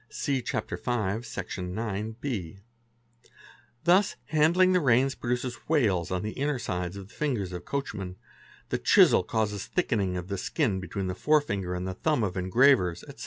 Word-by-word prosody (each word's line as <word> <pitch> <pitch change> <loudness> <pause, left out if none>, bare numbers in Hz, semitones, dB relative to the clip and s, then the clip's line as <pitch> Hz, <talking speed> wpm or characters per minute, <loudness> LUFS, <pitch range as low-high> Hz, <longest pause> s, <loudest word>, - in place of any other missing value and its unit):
(See 135 -3 -1
Chapter - - -3
V., 110 -3 -1
Sec. 120 - -6
ix.B.). 105 - -4 1.3
Thus 185 +4 +4
handling 170 +4 +4
the 180 - +4
reins 130 -2 +3
produces 125 -1 -3
wales 105 - +2
on 90 +1 -2
the 105 - -3
inner 145 +2 -1
sides 90 -4 -3
of 95 -1 -8
the - - -18
fingers 120 -11 -2
of 90 - -6
coachmen; 105 -10 -4 0.5
the - - -1
chisel - - +6
causes 105 -3 -2
thickening 100 - 0
of 90 0 -5
the 100 -1 -3
skin 110 - 0
between 95 +1 -4
the 90 - -2
forefinger 100 -10 +1
and 90 +1 -3
thumb 150 -7 +2
of 95 -4 -2
engravers, 95 -1 +3
etc. - - -12
110 Hz, 160 wpm, -28 LUFS, 95-140 Hz, 1.3 s, chisel